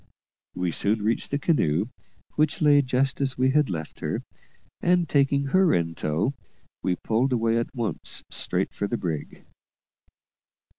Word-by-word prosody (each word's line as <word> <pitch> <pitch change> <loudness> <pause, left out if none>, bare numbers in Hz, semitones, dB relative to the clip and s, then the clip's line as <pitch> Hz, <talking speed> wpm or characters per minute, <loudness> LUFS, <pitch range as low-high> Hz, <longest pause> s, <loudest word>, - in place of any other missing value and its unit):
We 90 -1 -1
soon 105 +6 +1
reached 110 +2 0
the 140 - 0
canoe, 110 - +1 0.4
which 155 0 +1
lay 145 -2 +6
just 130 +1 0
as 135 -1 0
we 130 +1 +3
had 150 0 +3
left 80 -4 -5
her, - - -3 0.6
and, 175 -1 +3
taking 140 -1 +2
her 185 -3 +5
in 85 -1 0
tow, 80 - -1 0.5
we 90 - 0
pulled 115 +8 0
away 115 -1 +2
at 115 - -4
once 115 -4 -3
straight - - -1
for 100 - -2
the 120 - -2
brig. 80 -7 -5
125 Hz, 150 wpm, -25 LUFS, 95-140 Hz, 0.6 s, lay